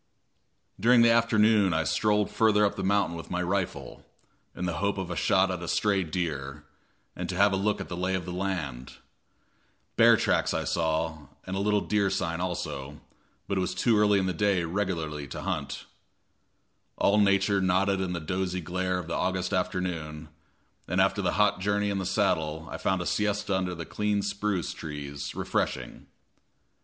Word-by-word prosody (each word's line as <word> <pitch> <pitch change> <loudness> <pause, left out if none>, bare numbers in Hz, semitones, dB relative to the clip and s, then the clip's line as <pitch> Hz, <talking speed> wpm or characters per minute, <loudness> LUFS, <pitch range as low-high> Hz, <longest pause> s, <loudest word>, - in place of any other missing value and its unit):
During 120 +1 +5
the 115 - +6
afternoon 110 -5 +4
I 80 - +1
strolled 105 +3 +1
further 105 -2 +3
up 100 - 0
the - - -4
mountain 100 -3 +1
with 85 - -8
my 90 0 -1
rifle, 90 -8 -3 0.5
in 90 - -3
the 85 -2 -2
hope 100 +2 0
of 95 -2 -4
a - - -3
shot 95 -1 +2
at 90 -1 -4
a 85 - -5
stray 100 +2 +1
deer, 75 -4 -4 0.5
and - - -5
to 90 - -3
have 100 +1 +4
a - - +2
look 100 +2 0
at - - -5
the 90 - -5
lay 90 +2 -1
of 90 -2 -3
the 90 - -5
land. 90 -10 -4 1.0
Bear - - +7
tracks - - +1
I - - -1
saw 80 -2 -1 0.2
and 95 - -4
a - - -1
little 105 0 +2
deer 105 -2 +1
sign 90 -3 -2
also, 75 -5 -4 0.5
but 100 -1 0
it - - +1
was 90 0 -2
too 115 +5 +2
early 105 -1 +4
in 95 - +1
the 95 - -1
day 95 0 +1
regularly 80 -5 -3
to - - -7
hunt. - - -3 1.1
All 105 +2 +3
nature 100 0 +3
nodded 95 +1 +2
in 90 -1 -2
the 85 - -2
dozy 90 +3 -2
glare 90 +2 -2
of 90 - -4
the 85 - -5
August 95 +1 -1
afternoon, 85 -4 -2 0.6
and 90 +2 0
after 95 +2 +2
the 90 - 0
hot 105 0 +2
journey 100 +1 0
in 100 - -1
the 95 - -2
saddle 80 0 0
I - - -4
found 95 -2 0
a - - -9
siesta 105 -1 0
under 90 -1 -1
the 85 -1 -6
clean 105 -1 -1
spruce 100 -3 -2
trees 70 -2 -6
refreshing. 65 -2 -3
95 Hz, 185 wpm, -28 LUFS, 85-100 Hz, 1.1 s, Bear